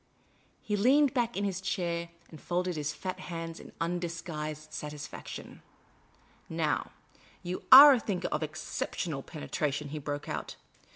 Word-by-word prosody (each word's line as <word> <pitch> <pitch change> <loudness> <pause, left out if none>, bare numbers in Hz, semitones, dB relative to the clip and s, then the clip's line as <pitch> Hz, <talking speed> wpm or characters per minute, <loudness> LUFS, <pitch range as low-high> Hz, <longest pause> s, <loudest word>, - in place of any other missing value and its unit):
He 210 - -1
leaned 265 +6 +4
back 240 -4 0
in 200 - 0
his 190 -2 -2
chair 170 -2 -2 0.2
and 155 - -11
folded 180 0 -1
his 150 -1 -2
fat 185 +3 -5
hands 165 -2 -6
in - - -12
undisguised 165 -3 -4
satisfaction, 150 -1 -7 0.4
" - - -33
Now, - - 0 0.5
you 180 +1 -4
are 280 +2 +12
a 255 - +2
thinker 190 -5 -2
of 150 - -1
ex 155 +2 -4
ceptional 150 -6 -3
penetration," 150 -2 -3
he 155 +1 -5
broke 145 0 -4
out. - - -4
170 Hz, 150 wpm, -30 LUFS, 150-190 Hz, 0.5 s, are